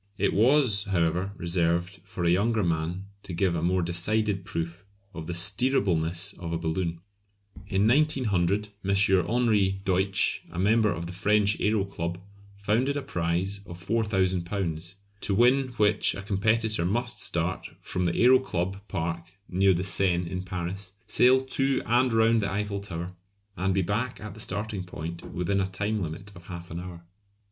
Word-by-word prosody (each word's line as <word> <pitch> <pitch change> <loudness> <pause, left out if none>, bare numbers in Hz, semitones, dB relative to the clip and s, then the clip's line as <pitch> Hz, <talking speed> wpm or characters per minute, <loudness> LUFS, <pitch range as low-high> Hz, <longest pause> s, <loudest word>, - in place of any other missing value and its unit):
It - - +1
was, 115 -2 +3
however, 90 0 0
reserved 85 +1 0
for 95 -3 -4
a 85 - +4
younger 110 +4 +2
man 85 +2 -1 0.2
to 90 - -8
give 90 +1 +1
a 85 - -1
more 90 +2 +1
decided 95 +4 0
proof 85 +1 -4 0.3
of 80 -2 -7
the 90 - -3
steerableness 95 -3 +1
of 85 -2 -5
a 85 - 0
balloon. 85 0 -2 0.7
In 100 +1 +2
1900 105 - +2
M. 100 0 +1 0.3
Henri 105 -5 +2
Deutsch, 95 +1 +2
a 85 - -10
member 105 +3 +3
of 85 - -4
the 85 - -6
French 105 +2 +2
Aero 105 -1 +2
Club, 85 -3 -4 0.4
founded 115 +8 0
a 140 - -3
prize 85 +4 -1
of 85 - -8
£4000, 95 -4 -1 0.3
to 100 - +1
win 125 +4 +4
which 105 0 +3
a 95 - -6
competitor 110 0 +1
must 120 +4 -1
start 85 +2 -1
from 90 - -3
the 85 - 0
Aero 130 +2 +6
Club 95 -5 -3
Park, 85 -2 -3 0.2
near 95 +1 +3
the 90 - -1
Seine 90 -2 +1
in 90 -1 -3
Paris, 90 +1 -5
sail 130 +1 +4
to 135 +1 0
and 125 +2 +3
round 115 0 +3
the 100 - -2
Eiffel 100 0 -2
Tower, 90 -3 -6 0.5
and 95 +1 0
be 95 0 +1
back 110 +7 -2
at 105 -1 -7
the 110 - -12
starting 105 -2 -3
point 85 -1 -7
within 100 +3 0
a 95 - 0
time 105 +3 -2
limit 90 +4 -6
of 85 0 -13
half 85 -1 -8
an 85 - -4
hour. 85 -1 -9
95 Hz, 165 wpm, -27 LUFS, 85-105 Hz, 0.7 s, Aero